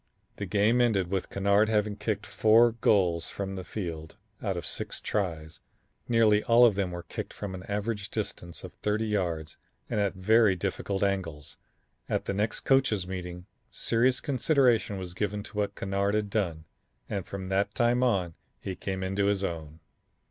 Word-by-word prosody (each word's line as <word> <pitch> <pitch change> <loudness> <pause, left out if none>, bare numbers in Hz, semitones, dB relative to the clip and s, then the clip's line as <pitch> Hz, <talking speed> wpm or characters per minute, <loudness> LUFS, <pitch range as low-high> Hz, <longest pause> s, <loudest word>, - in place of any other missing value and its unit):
The 100 - -4
game 105 +6 +3
ended 100 -7 +2
with 95 -2 -1
Kennard 100 +2 +3
having 105 -1 +1
kicked 110 0 -2
four 115 +2 +5
goals 90 -7 +2
from 95 -1 -4
the 95 -1 -5
field 85 -6 -6 0.2
out - - -1
of - - -4
six - - -4
tries. 80 -6 -3 0.5
Nearly 110 -3 +4
all 120 +1 +7
of 115 - +5
them 95 -1 -1
were 85 -1 -6
kicked - - -6
from 100 -2 -5
an 95 - -6
average 105 0 -2
distance 90 -5 -5
of - - -8
thirty 105 +1 -1
yards 85 -8 -2 0.3
and - - +1
at 100 -1 0
very 105 +1 +4
difficult 95 +3 -2
angles. 85 -7 -2 0.5
At - - -1
the - - -1
next 105 +3 -1
coaches' 130 -8 +2
meeting 90 -1 -6 0.2
serious 125 +3 +1
consideration 130 -6 +2
was 90 -2 -6
given 105 +2 -2
to 105 - -10
what 100 -1 -1
Kennard 100 +1 0
had 105 -1 -1
done 85 -7 -1 0.4
and 100 -3 -3
from 95 0 -6
that 100 +2 0
time 120 +1 +3
on 95 -9 +1 0.3
he 95 - -5
came 95 +1 -4
into 95 +2 0
his 100 -1 +1
own. 80 -3 -5
100 Hz, 170 wpm, -28 LUFS, 95-110 Hz, 0.5 s, all